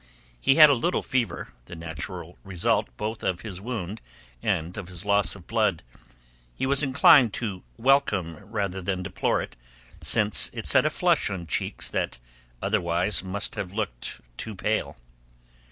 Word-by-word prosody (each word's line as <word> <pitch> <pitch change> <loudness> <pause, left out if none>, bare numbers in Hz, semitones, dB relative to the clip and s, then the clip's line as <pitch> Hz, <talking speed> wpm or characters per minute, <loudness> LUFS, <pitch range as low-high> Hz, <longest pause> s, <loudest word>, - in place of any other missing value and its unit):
He 135 - +4
had 155 0 +10
a 145 - +5
little 155 +8 0
fever, 125 -3 -1 0.2
the 85 - -9
natural 80 -2 -6
result 95 -3 0
both 110 +1 -4
of 90 -2 -1
his 95 -4 -7
wound 110 -3 -5 0.4
and 80 +3 -1
of 100 -5 -6
his 90 +1 -7
loss 100 0 +2
of 95 -3 -13
blood; - - 0 0.7
he - - -1
was 140 +1 +3
inclined 135 -4 +6
to 100 -6 -4 0.2
welcome 110 - +2
rather 95 +3 -4
than 95 0 -2
deplore - - 0
it, - - -10 0.5
since 105 -2 +4
it - - -6
set - - +5
a - - +2
flush - - +2
on 90 -3 -5
cheeks 80 - -1
that - - -2 0.5
otherwise 85 +5 +1
must 95 +2 -4
have 95 -1 -5
looked 85 - -4 0.2
too 110 - -5
pale. 105 -3 -1
100 Hz, 155 wpm, -26 LUFS, 90-115 Hz, 0.7 s, had